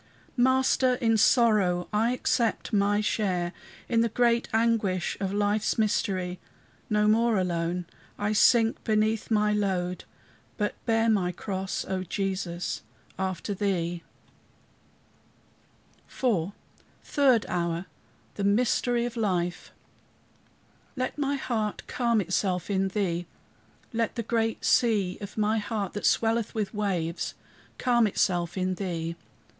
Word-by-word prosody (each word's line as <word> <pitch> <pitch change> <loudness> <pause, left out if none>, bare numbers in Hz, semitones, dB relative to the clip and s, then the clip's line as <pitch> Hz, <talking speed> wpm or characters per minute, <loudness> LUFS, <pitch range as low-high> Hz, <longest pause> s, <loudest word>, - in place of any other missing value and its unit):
Master 260 0 +3
in 230 -3 +2
sorrow! 210 -6 +3
I 220 +3 +2
accept 240 -2 0
my 205 0 +3
share 185 -5 -1 0.3
In 230 -1 +2
the 230 - +2
great 235 +1 +2
anguish 220 -5 +1
of 195 -1 -2
life's 205 +1 +1
mystery. 185 -4 0 0.5
No 210 0 +2
more, 225 +1 +3
alone, 175 -1 -1 0.3
I 205 +1 0
sink 225 +1 +4
beneath 215 0 +1
my 210 -1 +2
load, 185 -3 -1 0.5
But 210 -1 0
bear 225 0 +3
my 195 -5 +2
cross, 190 +1 -4
O 190 -1 -2
Jesus, 185 -2 -3 0.4
after 190 0 -2
thee. 175 -4 -1 2.1
IV 200 -8 0 0.5
THIRD 265 -6 +3
HOUR 170 0 -2 0.5
THE 200 - -4
MYSTERY 235 +3 +2
OF 240 0 -5
LIFE 180 -6 -1 1.2
"Let 255 -1 -2
my 285 0 0
heart 220 -6 -2
calm 235 -3 +1
itself 185 0 -1
in 195 0 +1
thee. 180 -4 -2 0.7
Let 230 -1 -1
the 230 - -2
great 225 0 -1
sea 210 -6 +2
of 200 +1 -8
my 215 +1 +2
heart, 205 -2 -3
that 205 - 0
swelleth 225 0 +1
with 215 -1 -2
waves, 185 -6 -2 0.4
calm 240 -3 +3
itself 175 -3 0
in 185 0 0
thee." 170 -3 -3
ST. 170 - -10
210 Hz, 120 wpm, -27 LUFS, 185-230 Hz, 2.1 s, sink